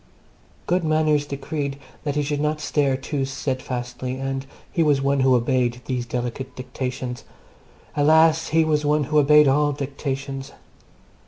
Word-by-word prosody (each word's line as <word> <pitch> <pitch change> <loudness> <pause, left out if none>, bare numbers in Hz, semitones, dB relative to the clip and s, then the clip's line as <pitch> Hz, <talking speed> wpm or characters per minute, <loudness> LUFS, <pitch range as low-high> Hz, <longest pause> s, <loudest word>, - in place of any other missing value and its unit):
Good 180 0 +1
manners 155 -2 +2
decreed 140 0 -4 0.3
that 145 -1 -1
he 150 - +1
should 145 0 -1
not 150 0 0
stare 140 -3 +1
too 135 +1 -3
steadfastly, 130 -2 -3
and 135 0 -3 0.2
he 170 - 0
was 150 -3 +3
one 140 0 +1
who 130 -1 +4
obeyed 125 0 +1
these 125 -2 -2
delicate 125 +2 -4
dictations. 125 -1 -5 0.7
Alas! 160 +2 +4
he 160 +1 +3
was 150 -1 +1
one 150 0 +2
who 150 +2 +2
obeyed 150 +1 +6
all 145 +2 +3
dictates. 135 -1 -5
140 Hz, 145 wpm, -23 LUFS, 130-150 Hz, 0.7 s, obeyed